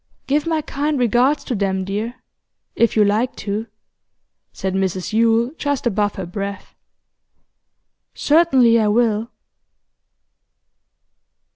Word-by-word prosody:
'Give 295 +3 0
my 320 -2 0
kind 290 +2 -2
regards 255 +4 +2
to 255 - -4
them, 190 -3 -1
dear 215 +5 -3 0.6
if 230 - +2
you 215 -1 +4
like 215 +5 0
to,' 210 +2 -4 0.8
said 190 -1 -4
Mrs 190 +1 -2
Yule 230 +2 +2
just 285 -3 -2
above 205 -2 0
her 190 - -5
breath. 200 +3 -6 1.4
'Certainly 265 -7 +4
I 215 - +2
will. 220 0 +1
230 Hz, 110 wpm, -20 LUFS, 205-255 Hz, 1.4 s, you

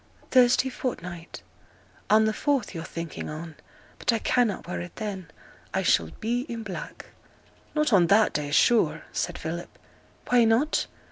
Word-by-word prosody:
'Thursday 255 0 +5
fortnight. 175 -10 -6 0.7
On 220 +1 +5
the 220 - +1
fourth 270 -3 0
yo're 165 -2 -5
thinking 165 -1 -6
on. 155 +1 -7 0.5
But - - +2
I 230 - +1
cannot 230 -4 +1
wear 180 - -3
it 175 0 -9
then, 200 -5 -5 0.5
I - - +1
shall 80 -1 +3
be 240 +5 -1
i' 235 - -3
black.' 220 -5 -7 0.6
'Not 300 -5 +2
on 180 -4 +6
that 210 +4 +4
day, 150 -1 -2
sure!' 225 +10 +3
said - - -2
Philip. - - -6 0.5
'Why 245 -1 +5
not? 230 +7 +2
215 Hz, 150 wpm, -26 LUFS, 175-240 Hz, 0.7 s, on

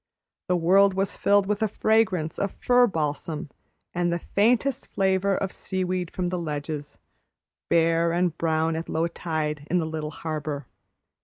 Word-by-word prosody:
The 180 - +2
world 190 +3 +4
was 195 0 -1
filled 200 -1 +3
with 205 +1 -1
a 220 - +3
fragrance 205 -6 +1
of 200 -1 -1
fir 245 0 +4
balsam 155 -2 -3 0.4
and 175 0 0
the 170 - +1
faintest 240 +9 +1
flavor 190 0 +1
of 195 - -2
seaweed 185 -2 -3
from 180 -1 -2
the 180 0 -2
ledges, 150 -2 -5 0.7
bare 165 0 +3
and 175 -1 +1
brown 160 -1 0
at 165 +1 -5
low 165 +1 +1
tide 155 -3 -3
in 180 - +2
the 170 - +1
little 155 -1 -4
harbor. 150 -3 -4
175 Hz, 155 wpm, -25 LUFS, 160-195 Hz, 0.7 s, world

